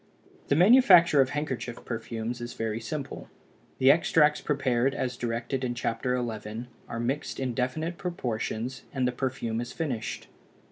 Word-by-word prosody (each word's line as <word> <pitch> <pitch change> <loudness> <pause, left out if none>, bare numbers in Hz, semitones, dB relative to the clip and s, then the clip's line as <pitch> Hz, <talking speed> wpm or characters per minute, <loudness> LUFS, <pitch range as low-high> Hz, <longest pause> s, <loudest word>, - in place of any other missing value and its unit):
The - - +3
manufacture 180 - +7
of 130 - +2
handkerchief 135 -5 -4
perfumes 115 +1 -4
is 120 0 -6
very 110 0 -2
simple: 135 +4 -6 0.5
the 130 +1 +7
extracts 150 -1 +3
prepared 135 -2 +1
as 125 -1 -2
directed 120 +2 -3
in 120 -1 -1
Chapter 120 +1 -1
XI. 110 -1 -4 0.2
are 115 - -4
mixed 135 +5 -2
in 130 -2 -1
definite 155 +8 -2
proportions 125 -6 -3
and 130 -3 0
the - - +1
perfume 120 -3 -2
is 120 - -6
finished. 125 -9 -3
125 Hz, 145 wpm, -28 LUFS, 120-145 Hz, 0.5 s, manufacture